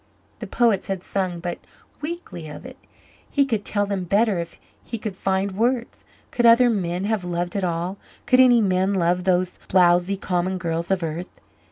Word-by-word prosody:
The -, -, -6 dB
poets 230 Hz, -7 st, +1 dB
had 190 Hz, -2 st, -3 dB
sung 185 Hz, -3 st, -2 dB
but 175 Hz, 0 st, -4 dB, 0.4 s
weakly 295 Hz, -, -6 dB
of 150 Hz, +10 st, -10 dB
it. 260 Hz, +1 st, -11 dB, 0.5 s
He 280 Hz, -1 st, +2 dB
could 225 Hz, -6 st, -1 dB
tell 205 Hz, -1 st, 0 dB
them 200 Hz, -2 st, -2 dB
better 200 Hz, +1 st, +2 dB
if 170 Hz, 0 st, -7 dB, 0.2 s
he 230 Hz, -, -5 dB
could 215 Hz, -3 st, -5 dB
find 190 Hz, +1 st, -1 dB
words. 235 Hz, +4 st, -1 dB, 0.3 s
Could 240 Hz, -1 st, +3 dB
other 235 Hz, +1 st, +6 dB
men 180 Hz, -3 st, -2 dB
have 210 Hz, -2 st, -1 dB
loved 175 Hz, +1 st, -3 dB
at 200 Hz, -, -1 dB
all 175 Hz, +2 st, -2 dB, 0.3 s
could 255 Hz, +1 st, +4 dB
any 245 Hz, -2 st, +6 dB
man 190 Hz, 0 st, +1 dB
love 180 Hz, 0 st, +1 dB
those 185 Hz, -1 st, +1 dB
blowzy, 180 Hz, +1 st, +3 dB
common 185 Hz, 0 st, -1 dB
girls 170 Hz, -1 st, -3 dB
of 190 Hz, -2 st, 0 dB
earth? 165 Hz, +3 st, -5 dB
190 Hz, 180 wpm, -23 LUFS, 175-220 Hz, 0.5 s, other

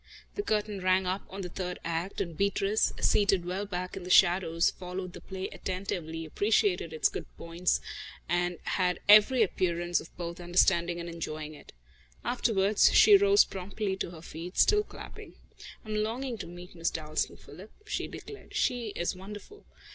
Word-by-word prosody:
The 410 Hz, -, -2 dB
curtain 210 Hz, -, -1 dB
rang 185 Hz, +1 st, +3 dB
up 185 Hz, +2 st, -3 dB
on 195 Hz, +1 st, -6 dB
the 180 Hz, -, -5 dB
third 180 Hz, 0 st, -4 dB
act, 170 Hz, +3 st, -3 dB
and 170 Hz, -2 st, -4 dB
Beatrice, 200 Hz, +3 st, +1 dB
seated 200 Hz, -4 st, +3 dB
well 190 Hz, +3 st, -3 dB
back 185 Hz, -1 st, -4 dB
in 195 Hz, -, -6 dB
the 180 Hz, -, -8 dB
shadows, 175 Hz, -2 st, +4 dB
followed 180 Hz, 0 st, -6 dB
the -, -, -10 dB
play 190 Hz, 0 st, -5 dB
attentively, 175 Hz, -4 st, -4 dB
appreciated 195 Hz, -1 st, +1 dB
its 155 Hz, -, +2 dB
good -, -, -6 dB
points 170 Hz, +2 st, 0 dB, 0.5 s
and 175 Hz, 0 st, 0 dB
had 180 Hz, -2 st, 0 dB
every 215 Hz, +4 st, +7 dB
appearance 175 Hz, -3 st, 0 dB
of -, -, -12 dB
both 170 Hz, +1 st, -5 dB
understanding 175 Hz, 0 st, +2 dB
and 170 Hz, -, -5 dB
enjoying 155 Hz, -2 st, -5 dB
it. 150 Hz, -, -14 dB, 0.5 s
Afterwards, 210 Hz, -4 st, +3 dB
she 415 Hz, -, +8 dB
rose 405 Hz, +1 st, +6 dB
promptly 195 Hz, +1 st, -4 dB
to -, -, -3 dB
her 165 Hz, -2 st, -11 dB
feet, 170 Hz, +3 st, -8 dB
still 420 Hz, 0 st, +5 dB
clapping. -, -, -11 dB, 0.5 s
"I'm 215 Hz, -, -5 dB
longing 230 Hz, +3 st, -2 dB
to -, -, -6 dB
meet 175 Hz, +1 st, -11 dB
Miss 165 Hz, -1 st, -1 dB
Dalstan, 155 Hz, -1 st, -3 dB
Philip," 185 Hz, +9 st, -13 dB
she -, -, -3 dB
declared. 420 Hz, -, -10 dB
"She 235 Hz, -4 st, 0 dB
is 175 Hz, -, -1 dB
wonderful. 210 Hz, -, -11 dB
185 Hz, 165 wpm, -29 LUFS, 170-205 Hz, 0.5 s, she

